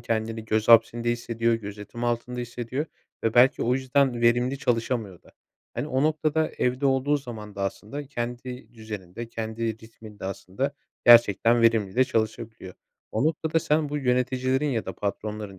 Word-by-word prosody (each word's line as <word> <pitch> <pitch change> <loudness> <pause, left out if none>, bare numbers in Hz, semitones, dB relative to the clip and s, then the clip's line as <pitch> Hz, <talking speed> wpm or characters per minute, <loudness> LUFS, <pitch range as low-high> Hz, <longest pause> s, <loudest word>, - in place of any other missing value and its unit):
kendini 115 -1 -2
göz 110 0 0
hapsinde 115 +1 +5
hissediyor, 115 -1 0
gözetim 105 +2 -6
altında 120 +1 -2
hissediyor 120 +4 -4 0.4
ve 115 - +1
belki 125 +2 +5
o 125 +2 +2
yüzden 130 -1 +1
verimli 120 +3 +2
çalışamıyor 115 -7 -1
da. - - -21 0.4
Hani, - - -2
o 130 -2 0
noktada 155 0 +1
evde 125 +3 +1
olduğu 135 +2 +2
zaman 110 -7 -8
da 100 - -4
aslında 130 +8 -4
kendi 120 -2 -6
düzeninde, 110 -1 -7
kendi 110 0 -3
ritminde 110 -2 -12
aslında 95 +8 -3 0.3
gerçekten 115 0 +6
verimli 110 -4 +3
de 130 - +5
çalışabiliyor. 110 -4 -3 0.4
O 110 - 0
noktada 160 +1 +1
sen 150 0 +1
bu 150 +1 -2
yöneticilerin 130 +1 +1
ya 115 -4 -1
da - - -3
patronların, 105 0 -4
120 Hz, 150 wpm, -26 LUFS, 110-130 Hz, 0.4 s, gerçekten